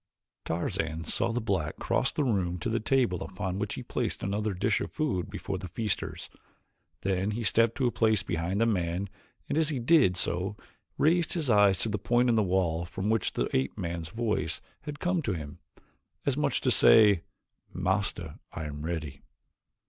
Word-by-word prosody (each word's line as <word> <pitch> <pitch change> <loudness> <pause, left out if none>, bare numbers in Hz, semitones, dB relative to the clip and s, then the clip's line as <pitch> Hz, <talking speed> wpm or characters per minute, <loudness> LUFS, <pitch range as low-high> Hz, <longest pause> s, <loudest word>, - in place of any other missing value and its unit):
Tarzan 80 -1 -2
saw 115 - 0
the 120 - -1
black 95 -9 -1
cross - - +1
the 150 - -1
room 95 -8 0
to 85 - -3
the 115 - +1
table 115 -6 +1
upon 95 0 -4
which 105 0 -2
he - - -6
placed - - -3
another 105 +2 -1
dish 100 +3 +1
of - - -4
food 115 - -1
before 100 -1 -4
the 95 - -6
feasters. 105 +4 -3 0.7
Then 95 0 0
he 115 +2 -2
stepped 115 +2 +3
to 130 - 0
a 120 - +2
place 110 -3 +2
behind 85 +2 -2
the - - +5
man 95 -2 -1 0.4
and 155 - 0
as 160 -1 +2
he 145 - -1
did 125 - +4
so 90 +3 -1 0.4
raised 170 +2 +3
his 155 -8 0
eyes 100 -3 +5
to 115 - 0
the 105 -1 -2
point 120 +4 +2
in - - +4
the 110 - +4
wall 90 -4 +1
from 95 +4 -2
which 110 -3 0
the - - 0
ape 65 +8 0
man's 85 -4 -4
voice 105 -6 -1 0.3
had 145 -1 -6
come 180 -1 +1
to 115 -9 -1
him, 80 -1 -7 0.7
as - - +2
much - - 0
as - - +1
to - - +2
say, 105 -6 +7 0.5
"Master, 95 -4 -1
I - - -5
am 75 -1 -6
ready." 75 -4 -4
100 Hz, 190 wpm, -29 LUFS, 85-115 Hz, 0.7 s, say